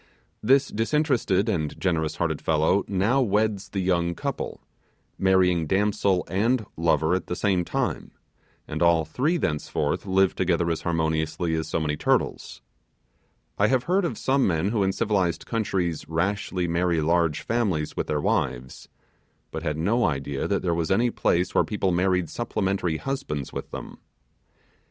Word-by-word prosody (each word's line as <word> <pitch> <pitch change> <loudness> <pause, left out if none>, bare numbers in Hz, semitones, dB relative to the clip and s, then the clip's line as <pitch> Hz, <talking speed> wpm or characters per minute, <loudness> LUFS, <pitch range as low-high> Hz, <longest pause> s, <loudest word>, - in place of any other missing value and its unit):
This 135 +5 +3
disinterested 115 - +1
and 80 -9 -2
generous 80 -4 0
hearted - - -1
fellow 80 +5 +2
now 100 +8 +2
weds 105 -3 0
the 95 0 -2
young 85 -2 +1
couple - - -4 0.6
marrying 90 -4 +3
damsel 100 -1 +1
and 110 +4 +1
lover 80 0 +2
at 95 - -1
the 90 - -2
same 95 -1 +1
time - - -2 0.6
and - - -5
all 85 -2 +4
three 140 - 0
thenceforth 75 - -2
live 95 0 +3
together 85 -2 +1
as 80 - -2
harmoniously 80 0 -1
as 80 -1 -1
so 80 - -1
many 75 -1 -1
turtles. - - -1 1.0
I 100 - +5
have 130 +1 +2
heard 190 +6 +1
of 170 - -2
some 135 0 +2
men 90 +1 +1
who 110 -1 0
in 95 0 +2
civilized 95 -5 0
countries 95 -9 -2
rashly 90 +1 -1
marry 85 0 +1
large 85 0 +1
families 100 -10 -1
with - - -2
their 75 -1 -1
wives, 65 -2 -2 0.6
but 80 - -4
had 75 -2 -2
no 110 +9 +2
idea 70 -1 -2
that - - -1
there 85 -2 +1
was 85 -1 -1
any 115 +5 +2
place 90 -4 +1
where - - +4
people 100 -3 -1
married 90 0 +1
supplementary 95 -4 -1
husbands 80 - -4
with - - -5
them. - - -8
90 Hz, 155 wpm, -25 LUFS, 80-105 Hz, 1.0 s, I